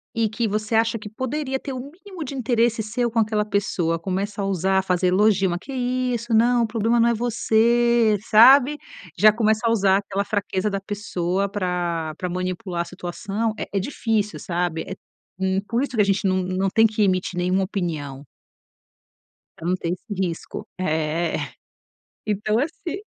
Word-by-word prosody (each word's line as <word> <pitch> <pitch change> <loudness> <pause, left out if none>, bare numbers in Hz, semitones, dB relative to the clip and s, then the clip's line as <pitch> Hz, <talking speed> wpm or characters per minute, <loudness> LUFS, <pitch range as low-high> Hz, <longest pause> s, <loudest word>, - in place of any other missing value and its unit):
e 225 -1 +1
que 225 +2 -1
você 215 +2 -2
acha 225 +1 +2
que 210 0 -8
poderia 260 +4 -3
ter 270 - -6
o 255 - -5
mínimo 370 0 -9
de 280 - -6
interesse 235 -2 +1
seu 235 +3 -1
com 230 - +1
aquela 215 -1 +1
pessoa, 195 -5 0
começa 195 +4 -3
a - - -1
usar 190 0 +1
fazer 180 0 +1
elogio. 195 +1 +3
"Mas 175 0 -2
que 275 - -10
é - - -5
isso? 250 -2 -1
Não. 240 +2 +4
O - - 0
problema 225 +1 +1
não 235 +1 +4
é - - +2
você", 235 -1 +2
sabe, 265 +6 +7 0.4
já 215 0 +8
começa 220 0 +1
a - - +3
usar 195 -4 +3
aquela 200 0 -2
fraqueza 205 -1 -1
da 195 -1 -2
pessoa 195 -2 -2
pra 175 -5 -2
pra 180 - -3
manipular 180 0 -3
a - - -3
situação, 195 +5 -3
é - - -2
é 200 - +1
difícil, 215 -2 -1
sabe. 175 -2 -2
Eh, 190 - -5 0.5
hum, 190 0 +1
por 235 +1 0
isso 275 -2 -3
que 215 - +4
a - - +6
gente 195 0 +1
não 185 0 +1
não 185 +1 -1
tem 225 +4 +4
que 215 -1 0
emitir 185 -2 0
nenhuma 185 +2 +1
opinião. 155 -8 -4 1.4
Pra - - -9
não 180 - +2
ter 170 -2 -4
esse 185 +5 -5
risco. 180 -4 -4
É. 160 -1 0 0.9
Então, 215 +1 0
assim 325 +6 -3
210 Hz, 180 wpm, -23 LUFS, 185-230 Hz, 1.4 s, já